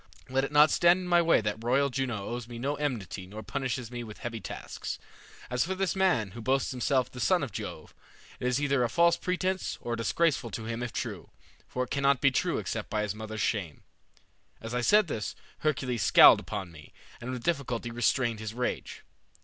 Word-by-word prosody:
Let 135 +1 +1
it 135 - -3
not 150 +1 +6
stand 175 +2 +4
in 180 - -6
my 175 -1 +5
way 165 -7 +4
that 105 +1 -3
royal 135 +3 +2
Juno 120 -6 -2
owes 120 -1 -5
me 120 -1 -8
no 135 +5 -1
enmity 120 -10 -3
nor 105 +3 -8
punishes 130 -3 -3
me 120 -1 -5
with 110 -2 -10
heavy 115 -1 -5
tasks. - - -6 0.5
As 125 0 +1
for 190 +2 -2
this 195 0 0
man, 175 - +2
who 115 - -8
boasts 135 +4 +1
himself 130 0 0
the 125 - -9
son 100 - +3
of - - -4
Jove, - - -7 0.5
it 125 - -1
is 125 +1 +1
either 140 -3 +2
a 120 - +1
false 170 +6 +4
pretence, 185 +1 -2
or 120 0 -3
disgraceful 130 +2 +1
to 110 +1 -6
him 115 +1 -4
if 120 -1 -3
true, - - -5 0.4
for 125 - -2
it - - -8
cannot 140 -1 +2
be 140 0 +4
true - - 0
except - - -4
by 105 -1 0
his 105 -2 -2
mother's 110 0 -6
shame.' 90 -9 -2 0.8
As 115 +1 -7
I 125 - 0
said 210 - +5
this 105 - -4 0.2
Hercules 125 -6 -1
scowled - - +8
upon 100 -5 -5
me, 75 -3 -14 0.3
and 120 - -6
with 125 -2 -4
difficulty 125 -8 -1
restrained 120 -1 +1
his 110 0 -6
rage. 125 0 -3
125 Hz, 205 wpm, -29 LUFS, 115-140 Hz, 0.8 s, scowled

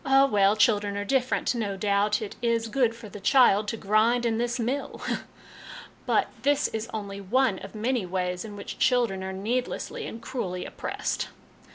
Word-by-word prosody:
'Oh, 270 0 +5
well 205 -5 +3
children 210 -2 +2
are 205 - -2
different; 260 +2 +1
no 210 -5 -2
doubt 205 +2 +1
it 205 - -7
is 230 -1 +1
good 235 -1 +2
for 230 -1 -10
the 205 +1 -9
child 210 -2 +5
to 225 - -2
grind 220 +4 +2
in 225 -1 +1
this 240 +1 -1
mill! 255 +5 -2 0.5
' - - -15
But - - +2
this 285 +3 +2
is 220 0 -4
only 200 -2 -5
one 230 +1 +2
of 195 +3 -10
many 230 -2 0
ways 180 0 -2
in 210 -2 -8
which 200 - -7
children 240 -7 +2
are 190 - -4
needlessly 245 - -3
and 225 - -7
cruelly 185 -9 -4
oppressed - - -3
220 Hz, 180 wpm, -27 LUFS, 200-245 Hz, 0.5 s, Oh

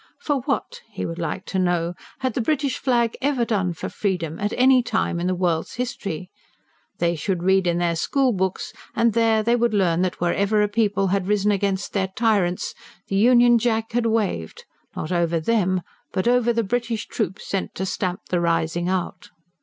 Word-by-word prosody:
For 295 -12 -1
what, 485 0 -2
he - - -4
would 165 +1 -5
like 175 +3 -3
to 190 - -2
know, 175 -1 +1 0.3
had 260 -3 0
the 245 - -1
British 280 +2 0
flag 235 -3 +1
ever 270 -4 +1
done 195 -6 0
for 165 - -5
freedom, 175 -6 -2
at 205 +1 -1
any 255 0 +6
time 205 -7 -1
in 175 - -1
the 185 - +1
world's 175 -3 -1
history? 195 -7 -4 0.7
They 170 0 +1
should 175 +2 -2
read 190 0 +3
in 170 0 +1
their 175 -1 +1
school 260 - +1
books, 190 -1 -2 0.2
and 230 -1 +3
there 225 -1 +3
they 235 +2 +3
would 235 -2 +1
learn 175 -4 +2
that 185 -1 -1
wherever 200 +4 +2
a - - +2
people 205 -2 +1
had 190 -1 0
risen 210 0 +2
against 195 -1 -1
their 190 -2 +1
tyrants, 205 -6 +1 0.4
the 195 - -1
Union 240 +2 +5
Jack 225 -1 0
had 235 0 +1
waved, 205 - -2 0.3
not 155 - -4
over 170 -1 +1
them, 185 -1 +1 0.3
but 185 +3 -1
over 240 -1 +3
the 230 0 0
British 230 +1 -2
troops 200 -3 -3
sent 195 - -3
to 190 - -2
stamp 185 +1 -2
the 175 -1 +1
rising 170 +1 0
out. 185 -1 -3
200 Hz, 190 wpm, -23 LUFS, 180-230 Hz, 0.7 s, any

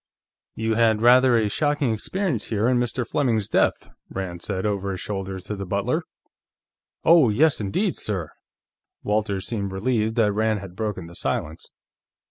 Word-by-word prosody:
"You 110 0 -1
had 110 -1 +3
rather 125 0 +6
a 110 -2 +2
shocking 145 +1 0
experience 160 - -2
here, 110 0 0
in 125 -1 +3
Mr. 120 0 -2
Fleming's 115 -8 0
death," - - +1 0.2
Rand 90 -3 -5
said, 95 0 -3
over 100 -2 -1
his 95 -2 -4
shoulder, 95 -1 -4
to 105 - -5
the 100 - -5
butler. - - 0 1.0
"Oh, 160 -7 +6
yes 140 +5 +3
indeed, 175 - -1
sir!" 95 -7 -3 0.7
Walters 105 -2 -1
seemed 100 -3 -3
relieved 110 +2 0
that 110 -4 +3
Rand 110 0 +1
had 95 -2 -10
broken 105 -4 -3
the 85 - -12
silence. 80 -1 -3
110 Hz, 155 wpm, -24 LUFS, 100-120 Hz, 1.0 s, rather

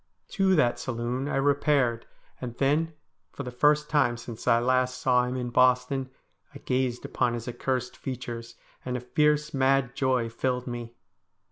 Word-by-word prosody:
To 195 -2 +2
that 125 -7 +2
saloon 125 +2 -3
I - - -2
re 140 +1 +3
paired, 135 -5 +1 0.3
and 120 -2 -6
then, 155 +4 +1 0.4
for 140 - -6
the 125 - -6
first 150 +4 +3
time 145 -6 +2
since 120 -1 -9
I 115 -1 +5
last 125 +1 +1
saw 125 -1 +3
him 125 +1 -3
in 125 -1 -3
Boston, 125 +1 +2 0.5
I - - -5
gazed 125 -1 -1
upon 120 -1 0
his 115 -1 -6
accursed 125 +1 -2
features, 120 -3 -6 0.3
and 125 0 -2
a - - -4
fierce, 150 +4 +1
mad 135 -1 +2
joy 130 -3 +1
filled 125 +2 -2
me. 120 -1 -6
125 Hz, 165 wpm, -27 LUFS, 120-135 Hz, 0.5 s, I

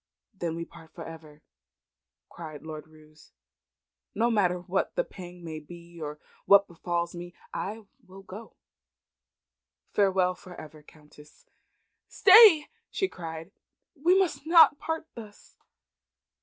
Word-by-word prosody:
"Then 170 -4 -4
we 170 0 -5
part 165 -1 -17
for - - -8
ever," 155 -2 -12 0.8
cried 155 -3 -10
Lord 155 -1 -8
Roos. 155 0 -20 0.8
"No 235 +3 +2
matter 185 -5 +2
what 180 +2 -2
the - - +1
pang 180 - -12
may 160 -2 -6
be 170 +2 -14
nor 150 -1 -6 0.3
what 200 0 +6
befals 170 0 -3
me 175 0 -9 0.2
I 215 +3 -5 0.2
will 190 +1 -13
go. 210 +4 -11 1.4
Farewell 190 -2 +2
for 180 -1 -13
ever, 155 -1 -12
Countess!" 150 0 -19 0.6
"Stay!" 390 -6 +7 0.2
she 385 - -1
cried. 165 - -8 0.4
"We 340 +6 +3
must 360 -5 -1
not 325 -3 +7
part 320 0 -4
thus." 215 -3 -13
175 Hz, 125 wpm, -27 LUFS, 160-215 Hz, 1.4 s, Stay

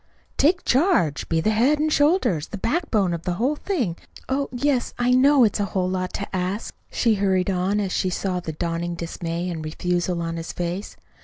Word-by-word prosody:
"Take 360 +5 +2
charge. 260 - +2
Be 165 -1 +2
the 215 - +2
head 250 +8 +3
and 305 +1 +1
shoulders, 290 - +2
the 205 - -6
backbone 220 - 0
of 170 - -3
the 180 - -2
whole 250 +11 0
thing. 255 - -2 0.3
Oh, 275 +1 -1
yes, 255 0 0
I 245 +1 +2
know 270 +1 +6
it's 215 -2 +2
a 205 - +1
whole 185 -1 +1
lot 185 0 -2
to 200 -1 -4
ask," 185 +4 -2 0.2
she 230 - +2
hurried 195 -2 +1
on, 190 +3 0
as 195 -3 -1
she 185 - 0
saw 185 0 -2
the 165 -2 -5
dawning 170 +2 -2
dismay 170 +1 -4
and 165 -3 -4
refusal 175 +2 -1
in 165 0 -3
his 165 0 -5
face. 175 +3 -4
190 Hz, 200 wpm, -23 LUFS, 175-250 Hz, 0.3 s, know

